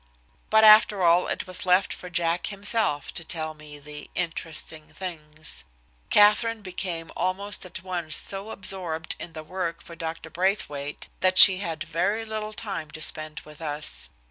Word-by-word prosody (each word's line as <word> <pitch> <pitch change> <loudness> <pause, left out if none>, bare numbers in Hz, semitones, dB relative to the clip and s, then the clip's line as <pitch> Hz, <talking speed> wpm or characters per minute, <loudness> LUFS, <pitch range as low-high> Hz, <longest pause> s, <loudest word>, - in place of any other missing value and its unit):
But, 220 0 +4
after 215 -2 +6
all, 170 +1 +4
it - - -3
was 185 -1 +2
left 185 +1 +2
for 180 - -10
Jack 170 0 -1
himself 200 - 0
to 170 - -4
tell 160 -1 -3
me 150 -1 -13
the 150 0 -11
"interesting 160 -2 -4
things." 155 - -5 0.5
Katherine 210 +2 +4
became 180 -3 -4
almost 195 +1 -1
at 185 - -7
once 175 -4 0
so 195 +2 +2
absorbed 180 -5 -2
in 170 - -8
the 155 - -8
work 170 0 -4
for 170 - -12
Dr. 165 -1 -7
Braithwaite 150 -5 -2
that 185 0 +2
she 185 -1 +11
had 165 -4 -4
very 180 +7 -2
little 215 -1 -5
time 195 -8 -6
to 150 - -10
spend 155 +1 +1
with 150 +1 -14
us. 145 - -1
175 Hz, 160 wpm, -25 LUFS, 155-195 Hz, 0.5 s, she